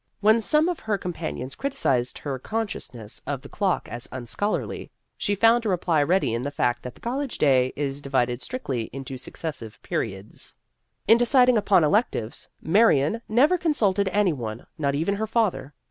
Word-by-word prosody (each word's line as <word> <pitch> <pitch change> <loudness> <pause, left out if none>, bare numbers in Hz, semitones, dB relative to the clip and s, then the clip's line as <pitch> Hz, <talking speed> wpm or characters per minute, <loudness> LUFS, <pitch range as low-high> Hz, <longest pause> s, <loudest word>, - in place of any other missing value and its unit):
When 220 +2 +4
some 305 +7 +3
of 355 -2 -1
her 215 -2 -1
com 180 -2 -4
panions 75 - -5
criticised 130 - 0
her 135 -3 -4
consciousness 130 - -5
of 140 -2 -3
the - - -10
clock 195 -4 0
as 120 +1 -5
unscholarly, 130 - -3 0.3
she 205 - 0
found 230 +3 +4
a 220 - -1
reply 175 -4 +2
ready 165 -4 +2
in 115 - -1
the 140 - -2
fact 120 -4 0
that 125 - -8
the - - -20
college 265 +2 -3
day 130 -3 +3
is 140 -1 -3
divided 125 -3 0
strictly 135 - -4
into 135 0 -6
successive 130 -3 -6
periods. 95 +2 -4 0.5
In 225 +1 +7
deciding 250 0 +5
upon 200 -5 +4
electives, 150 - 0 0.2
Marion 195 0 +3
never 285 +11 +4
consulted 205 - +1
any 200 -4 +3
one, 115 -4 -6
not 140 -4 0
even 170 +7 0
her 220 +1 -2
father. 215 - 0
170 Hz, 170 wpm, -25 LUFS, -, 0.5 s, In